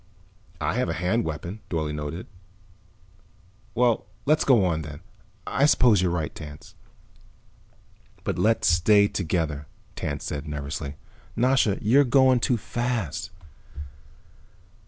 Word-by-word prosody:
"I 75 0 -1
have 125 - 0
a - - 0
hand 90 +7 0
weapon." 85 +6 -5
Dorle 80 -3 -2
nodded. 75 +4 -5 1.5
"Well, 120 -4 +2 0.2
let's 155 +2 +3
go 120 -8 +4
on, 80 -3 0
then. 75 0 -9 0.4
I 140 - +2
suppose 120 -9 +5
you're 90 - +2
right, 85 -3 -2
Tance." 75 -2 -10 1.5
"But - - -2
let's 115 +2 +2
stay 100 +4 +5
together," 80 -6 -2 0.3
Tance 70 -1 -4
said 75 +1 -5
nervously. 70 0 -5 0.4
"Nasha, 125 -4 +2
you're 130 +7 +5
going 130 -1 +4
too 125 0 +1
fast." 115 - -3
90 Hz, 115 wpm, -25 LUFS, 75-120 Hz, 1.5 s, suppose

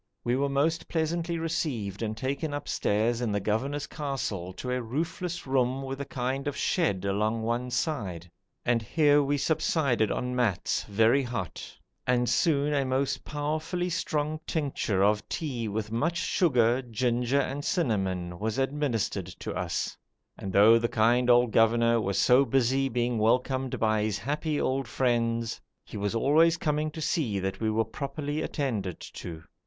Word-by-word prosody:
We 120 +1 +1
were 140 +1 +1
most 150 +4 0
pleasantly 165 +1 -1
received 140 - -2
and 110 -1 -2
taken 140 +5 -2
upstairs 120 -3 0
in 120 -3 0
the 100 - +1
governor's 130 +8 -1
castle 115 - -4
to 125 - -5
a 125 0 0
roofless 165 +8 -3
room 130 0 +1
with 135 +1 -5
a - - -3
kind 135 +2 -3
of 145 - -2
shed 100 - 0
along 105 +3 0
one 120 +2 -1
side, 100 - -2 0.4
and 120 -1 +2
here 145 +5 +3
we 145 +1 +1
subsided 140 -7 +1
on 125 0 -2
mats, 115 -8 0
very 115 +6 +3
hot, 120 -8 -5 0.3
and 125 -1 +2
soon 150 -1 +2
a 140 -1 +2
most 130 +1 -1
powerfully 155 +4 -2
strong 155 -2 -1
tincture 135 - 0
of 105 +1 +2
tea 125 -8 -3
with 105 0 -3
much 160 +10 0
sugar, 125 -9 +2
ginger, 120 +2 0
and 140 +1 -2
cinnamon 95 - -1
was 110 +3 -2
administered 135 - -1
to 90 0 -6
us; 90 -2 -2 0.4
and 95 - -6
though 110 +4 +7
the 120 0 0
kind 120 +3 +3
old 120 -1 +5
governor 115 +1 +4
was 100 -2 -1
so 125 +5 +5
busy 135 0 +2
being 120 -1 0
welcomed 125 +3 +1
by 110 -1 +2
his 105 -1 0
happy 150 +1 -2
old 130 -1 0
friends, 115 -2 0 0.2
he - - -11
was 105 +1 -2
always 160 +8 +4
coming 150 0 0
to 160 +1 -8
see 130 -10 0
that 95 0 -3
we 110 - 0
were 110 +1 +1
properly 145 +5 -4
attended 110 - -2
to. 80 -2 -8
125 Hz, 160 wpm, -28 LUFS, 110-145 Hz, 0.4 s, though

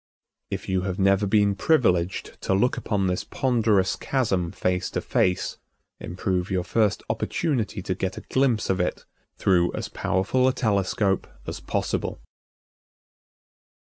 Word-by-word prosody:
If - - -5
you 95 -1 +1
have 95 -1 -3
never 100 +1 +3
been 100 0 +3
privileged 95 - +1
to 95 - +1
look 125 +6 +2
upon 100 -3 -1
this 90 -1 0
ponderous 110 -7 +1
chasm 95 -10 0
face 90 0 -1
to - - -2
face, 90 -1 0 0.4
improve 90 +1 -2
your 95 -2 0
first 105 +1 +1
opportunity 110 - -1
to 95 - -1
get 95 0 -3
a - - -5
glimpse 130 -7 +1
of 95 - -1
it 90 - -2 0.3
through 90 -2 +3
as - - -4
powerful 125 +8 +1
a 130 - +3
telescope 100 -4 +1 0.2
as - - -5
possible. - - -2
95 Hz, 140 wpm, -25 LUFS, 95-110 Hz, 0.4 s, never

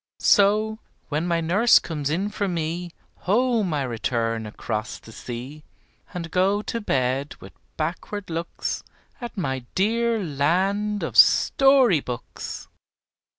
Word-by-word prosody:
So, 215 +2 +3 0.3
when 155 +3 -1
my 170 -1 +1
nurse 200 +9 +5
comes 150 -4 -2
in 185 +7 -1
for 205 -1 -2
me, 170 0 -3 0.4
Home 230 -3 +2
I 145 -2 0
return 115 -2 -2
across 110 +1 -4
the 110 - -14
sea, 125 +7 -8 0.5
And 170 -2 -6
go 195 +4 +2
to 230 - -3
bed 135 -4 -1
with - - -12 0.2
backward 180 +5 -4
looks 165 +1 -3 0.4
At 240 -2 -7
my 130 -8 -2
dear 230 +4 +1
land 190 +8 0
of - - -4
Story 270 - +5
books. 125 -2 -7
175 Hz, 125 wpm, -24 LUFS, 140-210 Hz, 0.5 s, nurse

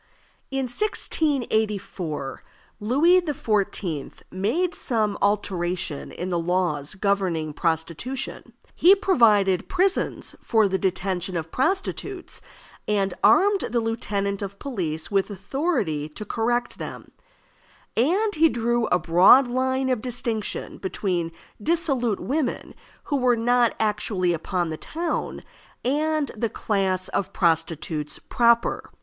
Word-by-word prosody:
In 270 0 -1
1684 220 - -1 0.4
Louis 295 - +4
XIV. 205 - -2 0.2
made 245 - 0
some 215 - -1
alteration 180 -6 -1
in 180 - -5
the 175 -1 0
laws 170 -3 -1
governing 185 -6 0
prostitution. 170 - -3 0.2
He 370 +4 +6
provided 215 - +3
prisons 375 +1 0
for 220 -2 +3
the 190 0 -1
detention 185 -1 -1
of 165 0 -5
prostitutes, 380 +4 -2 0.5
and 195 -3 +1
armed 390 - +5
the 235 +1 +1
lieutenant 200 -3 -2
of 200 0 -5
police 170 - -4
with 195 0 +1
authority 200 - -2
to 210 +7 -7
correct 240 +3 -1
them; - - -7 0.8
and 380 - +2
he 325 0 +4
drew 235 -1 0
a - - +3
broad 180 +10 +6
line 260 +1 0
of 250 -4 0
distinction 235 -3 -3
between 180 -3 -2 0.3
dissolute 270 - +1
women 275 -2 -2 0.3
who 285 - -1
were 250 -2 +3
not 240 0 +2
actually 205 -4 0
upon 170 +1 -2
the 155 - -4
town 335 - -3 0.4
and 300 +1 +1
the 225 +1 -1
class 190 -3 -1
of 195 0 -2
prostitutes 165 -3 0
proper. 235 -1 +1
210 Hz, 115 wpm, -24 LUFS, 185-260 Hz, 0.8 s, He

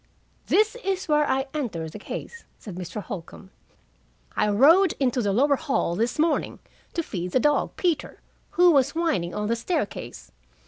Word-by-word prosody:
"This 430 +3 +3
is 385 -1 -2
where 300 -1 +2
I 265 0 +1
entered 190 - -3
the 210 - -9
case," 465 - -7
said 205 - -9
Mr. 180 +3 -6
Holcombe, 190 -1 -9 0.8
"I 210 - +2
rowed 315 - +5
into 255 -2 +1
the 205 -3 0
lower 280 +7 +3
hall 275 - -1
this 230 +5 -1
morning, 320 +2 +1 0.4
to 335 - 0
feed 180 - -5
the - - +4
dog, 295 +3 +1
Peter, 340 -5 -1 0.4
who 355 0 +7
was 280 -1 +2
whining 310 - 0
on 210 - -2
the 230 - +1
staircase. 235 - -4
265 Hz, 165 wpm, -25 LUFS, 205-320 Hz, 0.8 s, who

